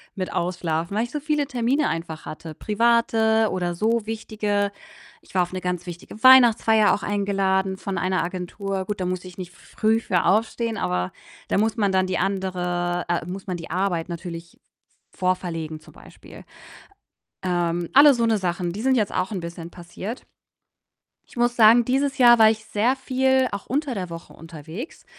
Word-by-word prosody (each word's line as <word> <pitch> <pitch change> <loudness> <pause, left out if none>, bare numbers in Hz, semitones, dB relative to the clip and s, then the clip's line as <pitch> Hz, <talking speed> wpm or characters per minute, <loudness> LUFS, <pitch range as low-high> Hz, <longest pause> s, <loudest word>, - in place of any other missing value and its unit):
mit 185 -2 -4
Ausschlafen, 170 +1 -2
weil 220 - +2
ich 240 - -6
so 300 - -3
viele 300 0 0
Termine 265 +2 0
einfach 165 -1 -5
hatte, 155 0 -8
private 225 0 +2
oder 175 -2 -2
so 220 +3 0
wichtige. 210 -2 -2 0.5
Ich - - -21
war 180 - +4
auf 175 - -7
'ne 185 - -4
ganz 180 -1 -3
wichtige 175 +5 -10
Weihnachtsfeier 230 -4 +6
auch 205 - -8
eingeladen 195 -1 0
von 195 -1 -4
einer 185 +1 0
Agentur. 190 +2 -4
Gut, 205 +1 -4
da 185 - -2
musste 185 0 -3
ich 180 - -13
nicht 180 -2 -7
früh 220 +5 -1
für 180 -6 0
aufstehen, 225 +2 +1
aber 90 0 -1 0.4
da - - +1
muss 220 +2 0
man 200 -3 +1
dann 190 0 +2
die 185 -1 -1
andere 180 -2 -2
äh, 175 0 -1
muss 190 +2 -7
man 185 -2 -3
die 165 - -9
Arbeit 180 -2 -1
natürlich 170 -1 -8 0.5
v - - -25 0.2
vorverlegen 165 -3 -6
zum - - -18
Beispiel. - - -14 1.0
Ähm, 175 -1 -1
alle 285 +1 +8
so 235 -2 0
'ne 225 -1 +2
Sachen, 175 -2 -2
die 205 - -5
sind 265 +2 +2
jetzt 215 -5 0
auch 185 +2 -1
'n 200 - -3
bisschen 170 0 -8
passiert. 185 +6 -8 1.0
Ich - - -20
muss 240 0 +1
sagen, 230 +1 +6
dieses 270 +3 0
Jahr 240 -2 +7
war 220 0 +8
ich 220 0 -3
sehr 230 +5 +1
viel 265 0 +1
auch 200 -1 -5
unter 280 0 -1
der 185 -4 -5
Woche 165 0 -9
unterwegs. 165 - -9
195 Hz, 180 wpm, -23 LUFS, 175-225 Hz, 1.0 s, alle